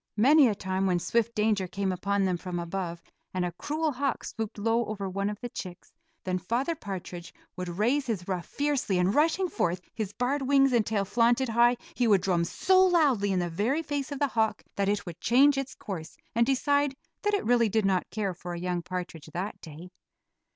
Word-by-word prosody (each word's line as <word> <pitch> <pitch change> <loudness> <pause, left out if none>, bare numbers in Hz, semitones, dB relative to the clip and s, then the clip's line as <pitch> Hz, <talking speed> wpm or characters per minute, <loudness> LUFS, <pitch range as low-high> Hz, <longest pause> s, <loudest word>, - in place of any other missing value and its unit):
Many 275 +5 +6
a 215 - 0
time 190 0 -1
when 180 -2 +2
swift 235 +6 0
danger 210 -3 +1
came 195 +1 -2
upon 195 +2 0
them 185 -1 +1
from 175 0 -5
above, 170 0 -4 0.3
and 180 -1 0
a 175 - -2
cruel 305 - -2
hawk 275 0 -2
swooped 220 -2 -5
low 225 +1 0
after 200 -2 -4
one 200 +2 -1
of 210 - -5
the 245 - -3
chicks, 180 -5 -9 0.3
then 185 0 -1
Father 240 - -1
Partridge 185 - -7 0.2
would 180 -1 -4
raise 265 +7 +1
his 195 -7 -3
ruff 180 -3 -3
fiercely 285 -9 0
and 180 +2 +2
rushing 325 +6 +2
forth, 175 - -1
his 215 -4 -3
barred 255 +6 -1
wings 270 0 +4
and 235 -2 +4
tail 205 -3 0
flaunted 240 +4 +2
high, 240 +2 +4 0.2
he 245 - +1
would 200 -4 +5
drum 175 -3 +1
so 375 - +3
loudly 290 - +3
in 190 - +1
the 175 -1 0
very 225 - 0
face 285 -1 -3
of 285 - -3
the 285 0 +1
hawk 220 -2 0
that 200 0 +1
it 205 0 -1
would 175 -2 -9
change 275 +4 +5
its 275 -1 -4
course 165 -6 -7 0.2
and 235 +1 +3
decide 285 +1 +2 0.3
that 415 0 +1
it 405 - -2
really 235 -1 +3
did 220 0 +1
not 190 -2 +1
care 205 -3 -2
for 175 0 -7
a - - -5
young 180 0 -2
partridge 175 -3 -6
that 190 +5 -4
day. 165 +3 -10
210 Hz, 210 wpm, -28 LUFS, 185-265 Hz, 0.3 s, Many